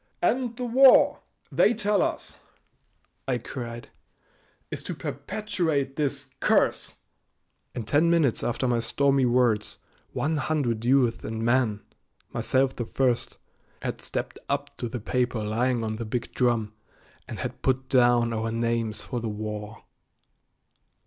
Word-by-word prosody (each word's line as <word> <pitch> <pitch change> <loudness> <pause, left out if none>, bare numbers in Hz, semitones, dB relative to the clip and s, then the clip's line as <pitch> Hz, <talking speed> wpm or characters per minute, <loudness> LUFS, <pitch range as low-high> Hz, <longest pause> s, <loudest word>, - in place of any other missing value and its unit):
"And 245 -2 0
the 250 - -3
war, 260 +2 +6 0.3
they 235 - +4
tell 210 -2 +2
us," - - -2 0.9
I 130 -2 +1
cried, 120 -1 -7 0.8
"is - - -4
to - - -4
perpetuate 160 -10 -2
this 145 -3 -2
curse!" - - +2 0.8
In 120 - -3
ten 145 +9 +3
minutes 160 -8 +2
after 120 +2 0
my 120 -1 +2
stormy 135 +3 +2
words 120 -3 +1 0.3
one 155 +1 -1
hundred 130 -6 -1
youths 125 -2 +3
and 110 +1 -3
men, 120 -4 +2 0.5
myself 135 0 +1
the 120 - -3
first, 125 0 0 0.5
had - - -3
stepped - - -4
up 140 0 -2
to 120 - -3
the 120 - -4
paper 120 0 -1
lying 120 +3 0
on 110 -1 -3
the 115 - -4
big 115 +2 -3
drum 115 -4 +1 0.5
and - - -6
had - - -5
put 130 0 0
down 120 -2 +4
our 115 0 -2
names 115 -1 -1
for 125 - -4
the 115 -1 -3
war. 105 +1 -6
125 Hz, 135 wpm, -26 LUFS, 115-140 Hz, 0.9 s, war